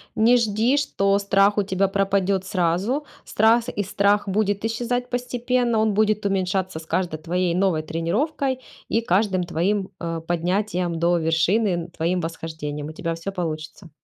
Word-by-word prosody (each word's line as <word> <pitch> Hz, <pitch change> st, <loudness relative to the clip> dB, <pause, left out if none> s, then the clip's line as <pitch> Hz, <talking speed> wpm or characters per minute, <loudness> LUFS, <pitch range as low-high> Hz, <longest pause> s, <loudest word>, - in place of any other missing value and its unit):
Не 230 Hz, +3 st, +5 dB
жди, 230 Hz, +2 st, +2 dB
что 200 Hz, -8 st, +1 dB
страх 200 Hz, +1 st, +3 dB
у 205 Hz, -, +3 dB
тебя 195 Hz, 0 st, +1 dB
пропадет 195 Hz, -1 st, +1 dB
сразу. 185 Hz, -, 0 dB, 0.2 s
Страс 230 Hz, +3 st, +3 dB
и 205 Hz, -, -1 dB
страх 200 Hz, +2 st, +1 dB
будет 205 Hz, +1 st, 0 dB
исчезать 245 Hz, +2 st, -2 dB
постепенно, 245 Hz, -1 st, 0 dB
он 220 Hz, -1 st, +2 dB
будет 215 Hz, 0 st, +1 dB
уменьшаться 190 Hz, -3 st, -1 dB
с 160 Hz, -, -12 dB
каждой 170 Hz, -1 st, -1 dB
твоей 175 Hz, +2 st, -1 dB
новой 185 Hz, -4 st, +2 dB
тренировкой 250 Hz, -, -1 dB, 0.3 s
и 225 Hz, -, +2 dB
каждым 190 Hz, -2 st, +1 dB
твоим, 190 Hz, +4 st, -1 dB
э, 165 Hz, -1 st, -3 dB
поднятием 175 Hz, 0 st, -1 dB
до 175 Hz, +1 st, +3 dB
вершины, 165 Hz, +7 st, +2 dB
н 175 Hz, -1 st, -2 dB
твоим 170 Hz, +2 st, -1 dB
восхождением. 160 Hz, -3 st, -5 dB
У -, -, -6 dB
тебя 165 Hz, +1 st, -3 dB
всё 165 Hz, +4 st, -5 dB
получится. 160 Hz, -1 st, -5 dB
195 Hz, 155 wpm, -23 LUFS, 170-215 Hz, 0.3 s, Не